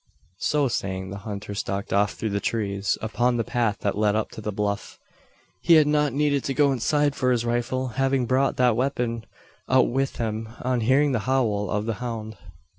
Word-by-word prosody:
So 145 -2 +1
saying, 95 -5 -3
the 100 - -6
hunter 105 0 -5
stalked 100 0 -3
off 100 +1 +2
through 110 - -3
the 100 - 0
trees 100 -2 -1
upon 120 +2 +1
the 115 - +1
path 115 -2 0
that 100 - 0
led 105 0 +2
up 110 - -1
to - - -8
the 105 - -3
bluff. 100 0 -3 0.6
He 170 - +6
had 155 -1 +6
not 150 -1 +2
needed 145 0 +1
to 135 - -2
go 140 0 +4
inside 145 +3 +1
for 125 -2 +1
his 120 -1 +1
rifle 120 +2 -1
having 135 +1 +1
brought 130 +3 +1
that 125 -3 +4
weapon 120 -3 -1 0.4
out 130 -1 +4
with 135 +2 -1
him, 110 -1 -3
on 125 -1 0
hearing 135 +5 +3
the 125 -1 -2
howl 105 -7 +1
of 105 +1 -1
the 115 - -1
hound. 110 -3 -5
120 Hz, 195 wpm, -25 LUFS, 105-130 Hz, 0.6 s, He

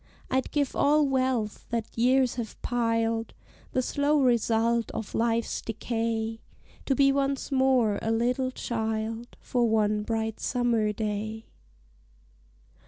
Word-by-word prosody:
I'd 260 0 +1
give 285 -3 -1
all 300 +1 +4
wealth 255 -5 -1
that 230 -2 -3
years 255 +2 +3
have 235 -3 -6
piled, 230 -2 0 0.4
The 255 - +1
slow 290 +3 +1
result 235 -2 +2
of 220 - -5
Life's 230 0 0
decay, 225 0 -2 0.5
To 270 - +2
be 275 0 +5
once 275 0 -1
more 260 -6 +3
a 225 - -2
little 245 +3 +1
child 225 -1 -3
For 240 -2 +1
one 210 -1 +2
bright 220 0 -2
summer 235 -4 +1
day. 215 +1 -4
230 Hz, 120 wpm, -27 LUFS, 225-255 Hz, 0.5 s, be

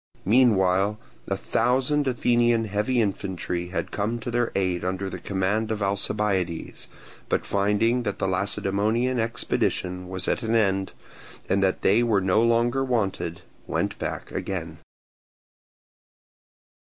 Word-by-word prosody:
Meanwhile 100 -3 +3 0.3
a - - -1
thousand 135 +4 +1
Athenian 120 -2 +2
heavy 105 +5 0
infantry 95 -4 -2
had 90 - -4
come 105 +3 -1
to 120 - -4
their 120 0 0
aid 90 -3 0
under 95 +1 -2
the 90 - -6
command 100 +4 -1
of 110 -2 -2
Alcibiades, 100 -3 -1 0.4
but - - 0
finding 105 +5 +2
that 100 -4 -3
the - - -1
Lacedaemonian 100 +6 0
expedition 90 -5 -1
was 95 -2 -2
at - - 0
an 115 -1 0
end, 95 -3 +1 0.6
and 100 +1 +2
that 95 -1 +1
they 105 +5 +4
were 115 -4 +3
no 95 +3 +2
longer 120 +3 +2
wanted, 95 -8 -1 0.2
went - - -2
back - - -4
again. 85 -4 -4
100 Hz, 130 wpm, -25 LUFS, 95-115 Hz, 0.6 s, they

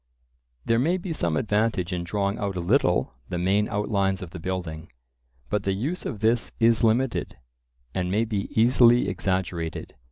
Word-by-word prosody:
There 115 0 +2
may 170 +8 +2
be 180 -2 -4
some 85 - 0
advantage 105 -3 0
in 90 -1 -2
drawing 100 +3 -1
out 100 -2 -2
a - - -2
little 90 - +2 0.2
the 90 - -2
main 95 +4 +1
outlines 100 -2 0
of 85 - -9
the 90 - -8
building; 85 -2 -5 0.6
but 105 - 0
the 100 -1 -1
use 145 - -3
of 110 -8 -6
this 115 +1 +2
is 115 0 +4
limited, 115 +3 +1 0.6
and 90 -1 -1
may 105 +5 +1
be 105 -3 -3
easily 120 +1 +5
exaggerated. 90 -3 -2
100 Hz, 165 wpm, -25 LUFS, 90-115 Hz, 0.6 s, easily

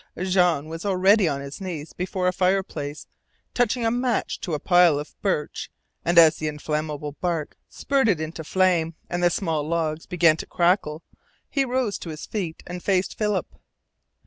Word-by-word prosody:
Jean 180 -5 +2
was 165 +1 -6
already 195 0 +4
on 140 -2 -1
his 140 +6 -8
knees 165 -5 -6
before 180 0 -2
a 180 - +2
fireplace 180 -6 -1 0.5
touching 245 -1 +1
a 225 - +2
match 245 0 -1
to 170 -5 -3
a - - -3
pile 175 -2 +5
of 150 +2 -6
birch, 170 -7 -2 0.3
and 170 0 +1
as 160 -1 +8
the 155 - -3
inflammable 150 0 -3
bark 170 -4 -2
spurted 230 - +1
into 160 +1 -5
flame 170 -1 +1 0.2
and 175 0 -1
the 175 - +5
small 165 -3 -1
logs 160 0 -2
began 165 -3 +4
to - - -7
crackle 170 -3 +1 0.5
he 275 - +2
rose 250 -4 -1
to 170 - -7
his 155 -1 -7
feet 180 -7 -4
and 180 0 -6
faced 190 -1 0
Philip. 210 -4 -1
175 Hz, 170 wpm, -24 LUFS, 155-190 Hz, 0.5 s, as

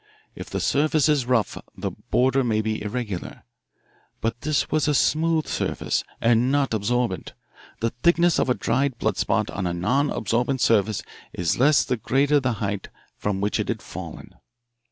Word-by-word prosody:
If - - -9
the - - -2
surface 155 +1 +2
is 145 -5 +2
rough 115 -6 +1 0.2
the - - -3
border 130 +1 +1
may 110 -3 +1
be 110 0 -2
irregular. 105 -3 -5 0.8
But 115 +1 -2
this 155 -1 0
was 155 -1 +2
a 150 - +2
smooth 160 +2 +2
surface - - -1 0.2
and 120 +2 +3
not 140 -4 +1
absorbent. 110 -1 -1 0.5
The 115 0 +1
thickness 170 +6 +3
of - - +1
a 125 - +3
dried 135 -2 0
blood - - -1
spot - - 0
on 95 -2 -2
a 85 - -2
non 125 +12 +1
absorbent 120 +4 0
surface 110 -2 +2 0.3
is 90 +3 -1
less 140 +1 +5
the 125 - -1
greater 140 +6 +2
the 130 -3 0
height 100 -2 -3 0.3
from 100 -2 -2
which 105 +1 0
it - - -1
has - - -1
fallen. - - -9
125 Hz, 170 wpm, -24 LUFS, 110-140 Hz, 0.8 s, less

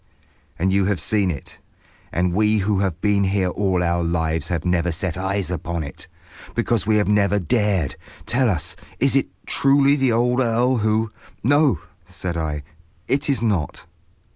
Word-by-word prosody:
"And 95 +3 +1
you 100 -1 +3
have 100 -1 0
seen 100 -3 +1
it. 75 -6 -6 0.5
And 90 0 0
we 105 +2 +3
who 100 -1 +1
have 95 -4 -1
been 100 -1 +2
here 95 -1 +1
all 95 -1 0
our 85 0 +1
lives 80 -2 -1
have 85 -2 -2
never 90 -1 +1
set 85 +1 -2
eyes 95 0 -2
upon 85 -1 -3
it. 70 - -9 0.5
Because 115 -4 0
we 110 - +3
have 105 -1 +2
never 105 0 +3
dared. 95 - 0 0.3
Tell 125 0 +2
us, 85 -7 -2 0.2
is 135 +2 +2
it 135 - +2 0.2
truly 140 +1 +4
the 135 -3 +2
old 125 +2 +2
earl 120 +2 +2
who—" 110 0 +1 0.3
"No," 140 - +3 0.2
said 90 0 -5
I, 75 -3 -3 0.4
"it 140 +3 0
is 135 -4 +1
not." 95 -9 -1
100 Hz, 165 wpm, -22 LUFS, 85-115 Hz, 0.5 s, truly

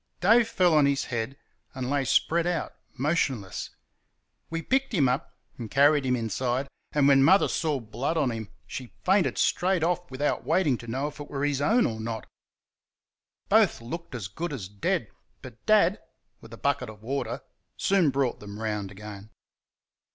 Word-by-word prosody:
Dave 225 +5 +5
fell 180 -6 +3
on 150 -2 +5
his 140 -1 +1
head 120 +4 -2 0.4
and 130 -2 -3
lay 140 +1 +1
spread 170 +6 +2
out, 175 -3 -2 0.2
motionless. 135 - -1 0.8
We 165 0 -3
picked 265 - 0
him 140 -7 +4
up 125 +2 -2 0.2
and 115 -2 -5
carried 140 +1 +4
him 125 - +3
inside, 125 +3 -1 0.2
and 145 -2 +3
when 135 -1 +6
Mother 190 +7 +6
saw 155 -5 0
blood 120 +8 -3
on 140 -5 +2
him 110 -3 -5 0.2
she 125 -3 -8
fainted 190 0 +2
straight 180 -1 +2
off 175 +1 0
without 135 +3 -1
waiting 155 -9 +2
to 120 - -10
know 135 +5 -2
if 150 - -15
it 145 - -8
were 140 0 -2
his 145 -1 0
own 225 +11 +4
or 110 -2 -2
not. 110 0 -4 1.2
Both - - +4
looked 150 +5 -7
as 110 -6 -4
good 165 - -5
as 105 -9 -5
dead; 100 0 -1 0.4
but - - -12
Dad, - - +4 0.4
with - - -14
a - - -9
bucket - - 0
of 105 -1 -12
water, 135 +4 -3 0.4
soon 190 -6 +3
brought 135 -2 0
them 105 0 -9
round 105 -3 -2
again. 100 +1 -10
135 Hz, 175 wpm, -27 LUFS, 115-165 Hz, 1.2 s, when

